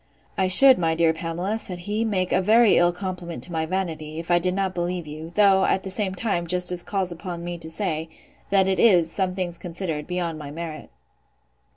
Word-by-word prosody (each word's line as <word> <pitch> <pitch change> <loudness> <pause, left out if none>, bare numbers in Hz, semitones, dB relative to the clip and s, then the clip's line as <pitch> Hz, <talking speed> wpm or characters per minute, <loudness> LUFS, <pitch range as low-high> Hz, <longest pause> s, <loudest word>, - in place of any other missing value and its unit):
I 190 - +1
should, 260 +7 +8
my 165 -2 +1
dear 165 -1 +2
Pamela, 175 +6 -3
said 180 -4 -2
he, 205 +5 -3
make 190 -5 -1
a 185 - +2
very 220 +2 +4
ill 175 0 +4
compliment 180 -2 -6
to 180 - -1
my 160 -1 -2
vanity, 160 -4 -4
if 165 +1 -5
I 175 - +4
did 180 +1 -1
not 195 -1 -1
believe 175 -1 -3
you; 155 +2 -9
though, 195 -2 +4
at 190 - +1
the 190 - -6
same 190 -1 -2
time, 180 -5 -2
justice 180 0 +1
calls 190 -1 -2
upon 175 0 -7
me 175 0 -5
to 160 -1 -6
say, 160 -3 -2 0.4
that 195 -1 +3
it 190 -1 0
is, 175 -8 +4
some 185 -1 -1
things 180 -2 -4
considered, 165 -4 -5
beyond 175 -3 -3
my 145 -2 -8
merit. 155 0 -7
180 Hz, 210 wpm, -23 LUFS, 165-190 Hz, 0.4 s, should